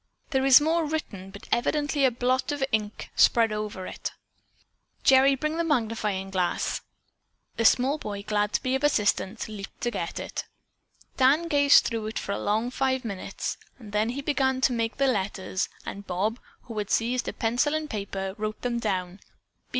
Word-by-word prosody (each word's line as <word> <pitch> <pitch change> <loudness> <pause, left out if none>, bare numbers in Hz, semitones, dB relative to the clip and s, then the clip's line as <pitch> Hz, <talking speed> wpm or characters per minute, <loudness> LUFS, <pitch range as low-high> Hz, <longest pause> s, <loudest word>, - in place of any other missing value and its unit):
"There 265 -1 +2
is 265 +1 +9
more 325 +3 +1
written, 290 -12 -4
but 200 +1 -12
evidently 290 +3 +1
a - - +6
drop 250 +2 0
of 290 -2 -1
ink 215 -1 -2
spread 230 -2 +5
over 210 -3 -4
it. - - -5 0.9
Gerry, 270 0 +6
bring 305 +4 -2
the 335 - +1
magnifying 220 - -1
glass." 185 -2 -1 0.8
The 230 - 0
small 270 +7 +4
boy, 200 -4 -5
glad 210 0 0
to - - 0
be 255 - 0
of 265 +2 0
assistance, 215 -6 +1
leaped 210 -2 -9
to 240 - 0
get 170 -7 -4
it. - - -5 0.7
Dan 280 +6 +4
gazed 285 -2 +6
through 225 -3 -2
it 220 - -5
for - - -3
a - - -2
long 220 +4 0
five 260 -1 0
minutes. 200 -4 -4 0.2
Then 215 -1 -1
he 275 +4 -4
began 265 -3 +1
to 260 - +3
name 230 -1 0
the 275 - +2
letters, 195 -5 -1 0.2
and 200 0 -7
Bob, 205 +6 -1 0.2
who 230 - -9
had 205 - -3
seized 245 +2 +1
a - - -1
pencil 245 +7 +1
and 310 0 -2
paper, 195 -4 -4
wrote 215 0 -4
them 240 -1 -1
down. 185 -4 -2
230 Hz, 175 wpm, -26 LUFS, 205-270 Hz, 0.9 s, is